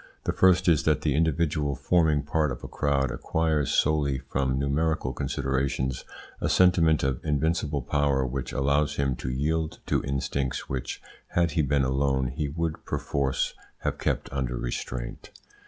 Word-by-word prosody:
The - - -1
first 90 -1 +4
is 80 -4 +5
that 75 -1 +2
the 75 -2 +1
individual 75 -2 +1
forming 80 -4 +2
part 75 0 0
of - - -6
a - - -5
crowd 70 -3 0
acquires, 80 +2 0
solely 75 -3 +2
from 65 0 -1
numerical 75 +4 0
considerations, 65 -1 -1 0.4
a - - 0
sentiment 85 -4 +4
of 65 -2 -1
invincible 75 -2 0
power 70 -1 +1
which 65 +1 -4
allows 70 +2 +1
him 70 -2 0
to 65 - -4
yield 75 +5 -1
to - - 0
instincts 70 -1 -2
which, 65 -2 -4 0.3
had 85 -1 +3
he 80 +1 +2
been 70 -1 +2
alone, 65 -1 +1
he 70 +3 -3
would 80 +1 -3
perforce 70 -1 -1 0.3
have - - -2
kept - - -1
under 65 -3 -2
restraint. - - -5
70 Hz, 155 wpm, -27 LUFS, 65-80 Hz, 0.4 s, is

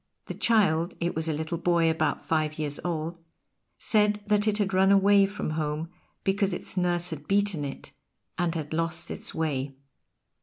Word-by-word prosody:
The - - -5
child 180 -7 +2
it 170 +1 -1
was 160 +1 0
a - - +1
little 160 +2 -3
boy 170 -1 +2
about 160 -1 0
five 155 -1 0
years 150 -2 -2
old 170 0 -3 0.6
said 210 -1 +2
that 210 0 +2
it 210 -1 +2
had 200 -2 0
run 190 +1 +4
away 200 0 +5
from 200 -5 -4
home 155 +1 -2 0.3
because 195 -1 +1
its - - -7
nurse 175 -1 +1
had 150 -2 -7
beaten 200 -5 +1
it, 140 - -7 0.4
and 175 -1 -1
had 155 -1 -4
lost 165 0 -2
its - - -5
way. 140 -4 -2
170 Hz, 175 wpm, -27 LUFS, 155-195 Hz, 0.6 s, away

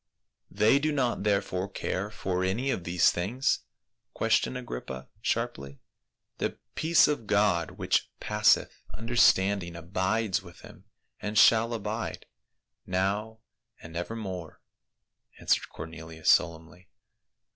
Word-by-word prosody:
"They 110 +6 +4
do 155 +2 0
not 135 -5 0
therefore 100 -2 0
care 100 +1 -3
for 95 -3 -2
any 115 +9 0
of 90 - -3
these 90 +1 +4
things?" 110 +10 0 0.6
questioned 125 - +1
Agrippa 65 - -7
sharply. 110 - -2 0.3
" - - -57
The - - -2 0.2
peace 170 +2 +4
of 145 -8 -2
God 100 -5 +1
which - - +1
passeth - - +2
understanding 100 -6 +2
abides 95 +4 -1
with 85 -2 -14
them, - - -14 0.4
and 105 0 -3
shall 115 +2 +6
abide, 110 0 -4 0.6
now 100 +4 -1 0.4
and 85 -1 -11
evermore," 90 -2 -5 0.8
answered - - +1
Cornelius 80 0 -2
solemnly. 85 +2 0
100 Hz, 115 wpm, -28 LUFS, 85-115 Hz, 0.8 s, shall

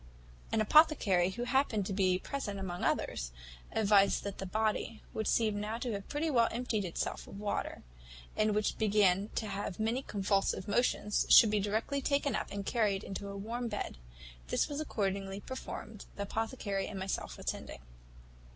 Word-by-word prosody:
"An 220 - +2
apothecary, 210 - +5
who 240 +6 -4
happened 245 -6 +1
to 195 - -3
be 185 -2 +3
present 205 -2 -4
among 180 -2 -4
others, - - -1 0.4
advised 200 -2 +4
that 200 -1 -5
the 195 - -4
body, 220 +2 -1
which 220 - -2
seemed 215 -3 +2
now 210 +2 -2
to 240 0 -3
have 200 -2 -5
pretty 295 +3 -1
well 235 -6 +4
emptied 230 -4 -1
itself 170 - -3
of 195 - -9
water, 210 0 -3 0.5
and 215 -1 +2
which 210 0 0
began 205 -2 +3
to 220 - -1
have 200 -2 -4
many 225 +4 0
convulsive 195 -4 0
motions, 210 -2 +1
should 220 - +9
be 210 - +2
directly 220 +8 -1
taken 280 -2 +1
up, - - -2
and 200 -1 -5
carried 210 -5 +1
into 195 +1 -5
a 200 0 -6
warm 235 +4 -3
bed. 210 - -4 0.5
This - - +1
was 290 0 -4
accordingly 195 -7 -2
performed, 220 -3 -7
the 200 - -3
apothecary 205 -2 -2
and 210 - -6
myself 190 0 -3
attending. - - -5
210 Hz, 170 wpm, -32 LUFS, 195-230 Hz, 0.5 s, should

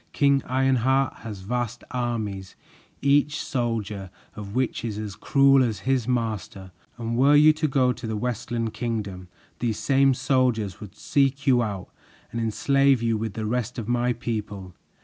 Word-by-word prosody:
King 140 -1 +3
Ironheart 130 0 +2
has 105 -4 -8
vast 120 +3 -3
armies, 110 -6 -3 0.5
each 145 +1 +3
soldier 110 -6 -3 0.3
of 105 0 -8
which 130 -2 -1
is 110 -3 -3
as 105 -2 -5
cruel 135 +4 +4
as 110 -6 -2
his 130 +1 0
master, 110 -6 -3 0.3
and 115 0 -3
were 140 +4 +5
you 155 +1 +7
to 155 0 -1
go 130 -3 +2
to 115 - -7
the 110 -1 -2
Westland 115 -1 -3
Kingdom, 105 -6 -4 0.3
these 115 -3 -1
same 135 -1 +3
soldiers 125 -8 0
would 105 -3 -10
seek 140 0 0
you 125 -3 +4
out 100 -5 -4 0.4
and 115 - -3
enslave 135 +3 +2
you 115 -1 +1
with 110 -1 -4
the 110 - -3
rest 125 +2 -2
of 115 -3 -4
my 120 0 +1
people. 105 -5 -5
120 Hz, 160 wpm, -25 LUFS, 105-130 Hz, 0.5 s, you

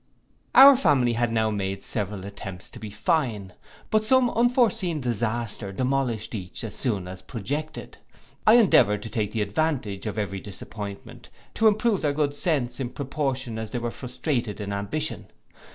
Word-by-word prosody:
Our 275 +1 +11
family 135 - +3
had 120 0 0
now 110 -1 +1
made 95 -1 -3
several 100 -2 -4
attempts 100 -2 -8
to 120 - -10
be 110 -1 -7
fine; 105 - -1 0.4
but 215 0 +3
some 250 +2 +4
unforeseen 230 - +2
disaster 115 -4 -2
demolished 125 -1 -1
each 90 -2 -5
as 110 -3 -5
soon 105 -9 -2
as 95 0 -8
projected. 145 +10 -5 0.5
I 220 - +8
endeavoured 105 - +5
to 115 - -6
take 105 -2 -1
the 110 -1 0
advantage 105 -4 -2
of 105 - -4
every 100 -2 -2
disappointment, 100 0 -9 0.2
to 225 - +3
improve 215 -1 +2
their 145 -2 +1
good 145 -1 0
sense 140 -7 -1
in 130 -3 -2
proportion 130 -4 -3
as 110 -1 -5
they 120 - -4
were 120 0 -2
frustrated 125 -4 -3
in 100 -1 -4
ambition. 150 +11 -3
120 Hz, 160 wpm, -25 LUFS, 105-150 Hz, 0.5 s, Our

